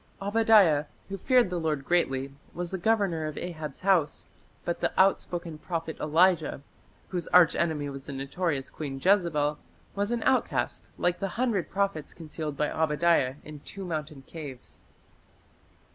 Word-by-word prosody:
" - - -34
Obadiah, 200 -7 +4 0.2
who 195 - -3
"feared 240 0 +3
the 175 - -1
Lord 155 -4 -1
greatly", 135 -6 +1 0.2
was 175 0 -4
the 190 - -3
governor 190 -6 +1
of 155 - -6
Ahab's 155 -5 -6
house, 185 -6 +1 0.4
but 170 - -2
the - - 0
outspoken 175 -4 +1
prophet 165 -1 -4
Elijah, 160 -2 +2 0.5
whose 180 -2 -3
arch 180 -3 +6
enemy 155 -4 0
was 135 -1 -8
the - - -5
notorious 140 +1 -2
Queen 135 -3 -5
Jezebel, 155 -5 +2 0.3
was 200 +1 -1
an 235 -1 -1
outcast 260 - 0
like 175 0 0
the 195 - -1
hundred 230 -8 0
prophets 195 -7 -2
concealed 155 -3 -6
by 150 0 0
Obadiah 155 -3 +2
in 150 -1 -9
two 195 +6 -8
mountain 155 -4 -5
caves. 145 -6 -10
165 Hz, 150 wpm, -28 LUFS, 150-190 Hz, 0.5 s, arch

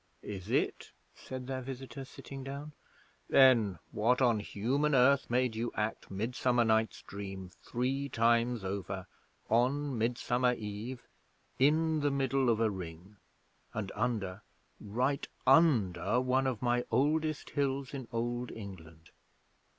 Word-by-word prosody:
'Is 95 -3 -7
it?' - - -1 0.2
said 130 -1 -7
their 130 0 -3
visitor, 135 +1 -7
sitting 135 +1 -9
down. 140 +3 -7 0.6
'Then 115 -8 +6
what 120 +4 +2
on 120 -4 +3
Human 135 +9 0
Earth 135 +2 +4
made 125 -1 +1
you 115 +2 -2
act 105 +1 -2
Midsummer 120 +4 +1
Night's 110 0 +1
Dream 95 -2 -7
three 135 +3 -2
times 115 -1 +2
over, 95 -1 -4 0.4
on 130 +5 +1
Midsummer 120 +2 +1
Eve, 110 +3 -6 0.6
in 155 +3 +3
the 145 0 +2
middle 135 -2 +1
of 115 -2 +2
a 110 -2 +2
Ring, 90 +2 -8 0.6
and 105 -2 -3
under 105 -6 -2 0.4
right 125 +7 -1 0.2
under 110 - +4
one 130 +1 +2
of 125 -4 -2
my 120 0 +2
oldest 155 +2 +1
hills 140 -1 -1
in 130 -4 -5
Old 120 +1 -2
England? 85 -6 -10
120 Hz, 125 wpm, -32 LUFS, 105-135 Hz, 0.6 s, Then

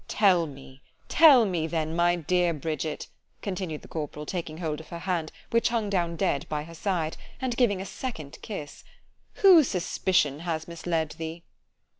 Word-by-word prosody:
——Tell 185 -6 +4
me——tell 140 - +3
me, 170 -5 -1
then, 160 -1 -2
my 175 0 +3
dear 175 +1 +1
Bridget, 155 0 -3 0.4
continued 185 -6 -4
the - - -12
corporal, 150 -1 -5
taking 165 -3 -4
hold 160 -3 -3
of 160 - -11
her 170 - -6
hand, 170 -3 -2 0.2
which 230 +1 +3
hung 225 -3 -1
down 170 -3 0
dead 140 -3 0
by 150 -1 -2
her 165 +2 -11
side,——and 185 - -3
giving 230 -6 +2
a 190 - -4
second 175 - -6
kiss——whose 285 - +1
suspicion 175 -5 +1
has 160 -2 -3
misled 165 -2 -2
thee? 165 +1 -5
170 Hz, 150 wpm, -27 LUFS, 155-190 Hz, 0.4 s, Tell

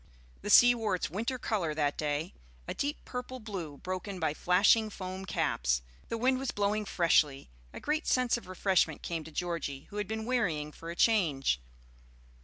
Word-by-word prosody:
The - - -5
sea 245 +3 +8
wore 220 -5 0
its 180 - -3
winter 230 +8 -2
color 185 -10 -1
that 145 -2 +1
day, 150 +3 -2 0.3
a - - -2
deep 290 +2 -3
purple 250 +1 -5
blue, 185 -10 -6
broken 185 +2 -5
by 160 -3 0
flashing 200 +7 +4
foam 190 -1 -6
caps; 60 - 0 0.3
the 230 - -2
wind 255 +2 +2
was 265 -1 -3
blowing 205 +1 0
freshly; 150 - +2 0.2
a - - -8
great 305 +2 -1
sense 250 -2 +3
of 235 - -7
refreshment 185 -4 +1
came 165 -2 -3
to 160 - -10
Georgie, 160 -5 -3
who 205 - -7
had 210 -2 -2
been 220 0 -3
wearying 175 -12 0
for 165 +2 -9
a 170 - -5
change. 155 - +2
185 Hz, 180 wpm, -31 LUFS, 155-225 Hz, 0.3 s, sea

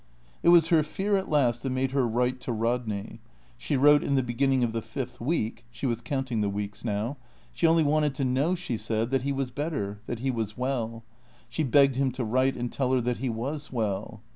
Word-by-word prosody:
It - - +4
was 170 -2 +6
her 165 -2 +5
fear 190 +7 -1
at 190 - -1
last 125 -6 +2
that 135 - -2
made 130 0 0
her 135 -3 +2
write 125 +2 0
to - - -3
Rodney. 115 -2 -2 0.4
She 140 +4 -2
wrote 145 +2 +6
in 140 - +1
the 130 - +2
beginning 130 +2 +1
of 115 -2 0
the 115 - -1
fifth 125 0 -6
week 120 -4 -1
(she 115 +3 -6
was 120 -2 0
counting 130 -3 -2
the 100 - +1
weeks 100 +1 -5
now). 115 +5 -2 0.4
She 140 +8 +2
only 165 0 +4
wanted 150 -1 +2
to 135 - -1
know, 135 +8 +1
she 165 -10 -3
said, 110 +2 -2
that 135 -1 +2
he 140 +2 -1
was 135 -2 -2
better, 105 -9 -3
that 120 - -3
he 130 +3 -1
was 110 -3 -3
well. 115 -3 -2 0.5
She 120 - -2
begged 135 -1 +4
him 135 -1 +2
to 130 -1 -3
write 130 +4 +1
and 120 0 -3
tell 130 -2 0
her 130 - +3
that 120 0 -1
he 130 +1 -1
was 135 +7 -4
well. 110 -2 -3
125 Hz, 225 wpm, -27 LUFS, 115-140 Hz, 0.5 s, was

